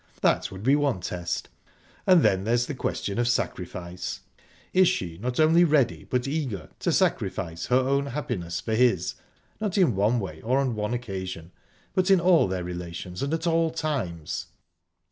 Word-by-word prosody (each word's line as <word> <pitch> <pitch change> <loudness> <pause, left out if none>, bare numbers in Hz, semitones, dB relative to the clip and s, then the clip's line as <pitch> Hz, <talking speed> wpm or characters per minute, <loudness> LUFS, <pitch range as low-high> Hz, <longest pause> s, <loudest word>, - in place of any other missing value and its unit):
That - - +2
would 95 +1 -9
be 135 +4 +5
one 145 -8 +1
test...And 90 - -1
then 95 0 +3
there's 120 +3 +2
the 145 - -4
question 110 -4 -2
of 120 - +2
sacrifice. 90 -6 -3 0.5
Is 185 0 +6
she, 90 - -2
not 125 +5 -3
only 160 +2 +6
ready, 150 -7 +2
but 125 +1 -1
eager, 135 - -3
to - - 0
sacrifice 85 +1 0
her 125 - +3
own 140 +2 +1
happiness 115 - -3
for 110 - -3
his, 110 -7 +2 0.5
not 210 -2 -2
in 170 - +4
one 105 +5 +2
way 80 -7 -6
or 125 +4 +1
on 135 -3 +1
one 105 +2 -2
occasion, 95 -7 -5 0.4
but 185 0 +2
in 195 -2 +6
all 175 - +5
their 95 -1 -2
relations 90 0 -6
and 140 +1 -1
at 165 +1 -1
all 165 -1 +3
times?..." 115 - -3
120 Hz, 165 wpm, -26 LUFS, 90-150 Hz, 0.5 s, Is